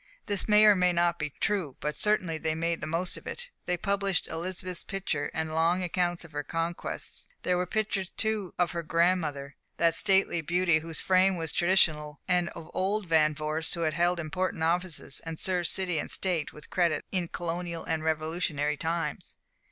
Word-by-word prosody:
This 205 -3 -1
may 210 0 +7
or 210 -1 +8
may 180 -1 +3
not 170 0 +1
be 150 -1 -2
true; 170 -2 -1
but 150 0 -2
certainly 185 -7 +1
they 160 0 -1
made 165 +1 -1
the - - -3
most 170 +3 0
of - - -11
it. 485 0 -6 0.2
They 180 - +1
published 200 -1 0
Elizabeth's 180 +2 -4
picture, 190 -7 -2
and 160 0 -3
long 170 +3 +2
accounts 175 -1 -1
of 165 - -14
her 145 -1 -2
conquests. 165 +3 -4 0.2
There 180 - +2
were 180 0 0
pictures, 200 -2 -1
too, 215 -4 -1
of 175 -1 +2
her 170 - -2
grandmother, 160 -4 0 0.2
that 170 -1 +3
stately 190 -2 +2
beauty 170 0 +2
whose 160 0 -3
fame 185 0 +4
was 165 -2 -3
traditional, 155 -5 +2
and 180 -1 +2
of 160 - -9
old 200 +2 0
Van 155 -2 +3
Vorsts 155 +2 +1
who 170 - -4
had 155 -2 +1
held 175 +2 +2
important 175 +1 -2
offices, 170 -4 -1
and 165 -1 -5
served 180 -1 0
city 180 -4 +1
and - - -4
state 175 -5 0
with 150 - -14
credit 170 -3 +1
in 180 -3 0
colonial 170 0 -4
and 160 -1 -2
revolutionary 155 -2 0
times. 165 +1 -3
170 Hz, 185 wpm, -29 LUFS, 160-185 Hz, 0.2 s, or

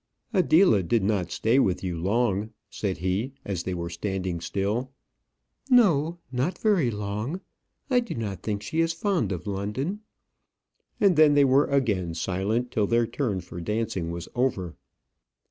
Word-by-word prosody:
"Adela 175 - +5
did 105 +4 +1
not 95 -4 0
stay 115 +5 +2
with 95 -7 +1
you 90 -2 -2
long," 100 +3 0 0.2
said 95 -4 -2
he, 95 - -1
as 95 -4 -2
they 95 - -3
were 85 -1 -3
standing 90 0 -3
still. 105 +8 -2 0.8
"No, 175 - +4
not 130 +8 -1
very 195 - +2
long. 105 - -3 0.5
I 255 -3 +3
do 235 - -4
not 100 -6 -4
think 105 -1 -3
she 160 - -3
is 165 0 +1
fond 165 - 0
of 90 +3 -4
London;" 105 - -3 1.0
and 195 -7 +4
then 155 -2 +6
they 145 -1 +6
were 135 +2 +4
again 105 -12 0
silent 100 +8 -1
till 105 -4 +1
their 115 +1 +3
turn 110 -7 -2
for 85 0 -8
dancing 105 -3 -2
was 85 0 -5
over. 100 -9 -1
110 Hz, 155 wpm, -26 LUFS, 95-140 Hz, 1.0 s, then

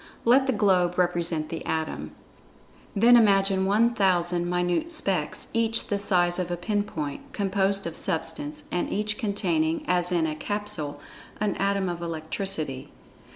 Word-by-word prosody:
Let 260 +3 +5
the - - +3
globe 185 -5 +2
represent 170 -3 +1
the 165 - -5
Atom. 160 0 -3 0.8
Then 235 +4 +6
imagine 195 -4 +4
1,000 190 -5 +2
minute 180 - 0
"specks," 190 - -1
each 230 0 0
the 205 - 0
size 175 -3 +2
of 180 -1 -2
a 175 - -2
pin 205 +4 0
point, 205 - -6
composed 195 -1 0
of 170 - -5
Substance, 160 -4 -3
and 175 - -1
each 210 +1 -2
containing, 170 -6 0
as 180 0 +1
in 170 -2 +2
a 155 - -1
capsule, 205 -5 -3 0.4
an 210 -2 0
atom 195 -1 0
of 175 -1 -4
electricity. 160 -4 -4
185 Hz, 145 wpm, -26 LUFS, 170-205 Hz, 0.8 s, Then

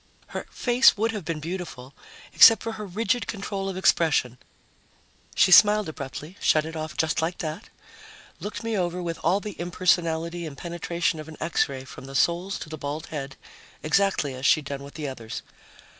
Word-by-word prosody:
Her - - -6
face 245 -1 +4
would 225 +2 +1
have 210 -4 -5
been 165 -1 -3
beautiful 155 -6 -6 0.4
except 225 -2 +8
for 230 - -3
her 215 -2 -7
rigid 220 +5 -1
control 195 -2 -4
of 190 - -5
expression; 145 -9 +2 1.0
she 190 - +4
smiled 210 +1 +7
abruptly, 150 +4 -7
shut 155 -1 +3
it 160 0 -7
off 155 +1 -5
just 160 -1 +1
like 165 +2 -2
that, 155 0 -5 0.7
looked 210 +2 -6
me 225 -1 -2
over 180 -2 -1
with 170 -1 -4
all 180 +4 +2
the 210 -1 -7
impersonality 170 -1 0
and 140 -3 -9
penetration 170 -1 -2
of 155 - -8
an 160 - -10
X 165 -2 +1
ray 130 -1 -6
from 130 - -11
the 135 0 -9
soles 175 +7 +1
to - - -8
the 155 -1 -8
bald 145 +2 -4
head, 135 -3 -5 0.5
exactly 160 -4 +1
as 130 0 -8
she'd 145 +1 +4
done 140 0 -5
with 140 0 -11
the 150 -2 -4
others. 115 -5 -7
170 Hz, 185 wpm, -25 LUFS, 150-195 Hz, 1.0 s, except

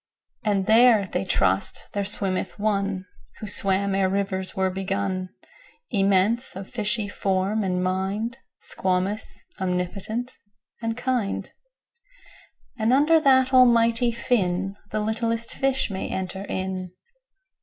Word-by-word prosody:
19And 200 -2 +2
there 225 -1 +6
(they 185 0 -2
trust) 95 - 0
there 200 - 0
swimmeth 190 -2 -1
One20Who 200 0 -3
swam 195 0 +1
ere 190 -1 +2
rivers 190 -1 -2
were 190 0 +1
begun,21Immense, 195 - -1
of 190 0 -7
fishy 215 -2 -2
form 195 +2 0
and 180 -1 0
mind,22Squamous, 195 0 -2 0.2
omnipotent, 190 +7 -3 0.4
and 225 0 -2
kind;23And 370 - -5
under 300 +5 +5
that 265 -3 +4
Almighty 235 -1 +5
Fin,24The 200 -2 -1
littlest 230 +1 -1
fish 270 -4 0
may 190 - -4
enter 190 +1 -4
in. 185 -2 -4
200 Hz, 100 wpm, -25 LUFS, 190-235 Hz, 0.4 s, there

